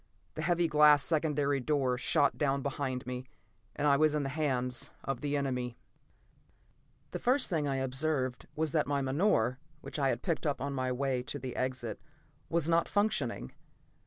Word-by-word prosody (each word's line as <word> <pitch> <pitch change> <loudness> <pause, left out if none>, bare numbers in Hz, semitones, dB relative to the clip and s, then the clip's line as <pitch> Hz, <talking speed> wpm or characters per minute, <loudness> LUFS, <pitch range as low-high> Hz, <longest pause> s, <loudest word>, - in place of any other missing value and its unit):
The 155 - -5
heavy 170 +1 +2
glass 150 -2 +6
secondary 150 -3 +1
door 135 -2 +1
shot 130 +3 +2
down 140 -2 0
behind 135 -3 -3
me, 125 +1 -5 0.5
and 145 - -1
I 140 -1 +5
was 155 0 +3
in 150 - 0
the 135 - -2
hands 130 -4 -1
of 135 -3 -3
the 145 0 0
enemy. 125 -3 -2 1.3
The - - -4
first 255 -2 +2
thing 155 -4 +1
I 135 - 0
observed 135 -1 -1
was 155 -1 0
that 155 -1 +1
my 140 -1 0
menore, 130 - +2 0.2
which - - -6
I 135 -1 +2
had 120 - -2
picked 165 -3 -1
up 145 - -1
on 140 +1 -3
my 130 -1 -1
way 130 0 0
to 130 - -5
the 130 -3 -6
exit, 130 -4 -3 0.5
was 165 -2 +1
not 170 0 +2
functioning. 150 - 0
140 Hz, 175 wpm, -31 LUFS, 130-155 Hz, 1.3 s, glass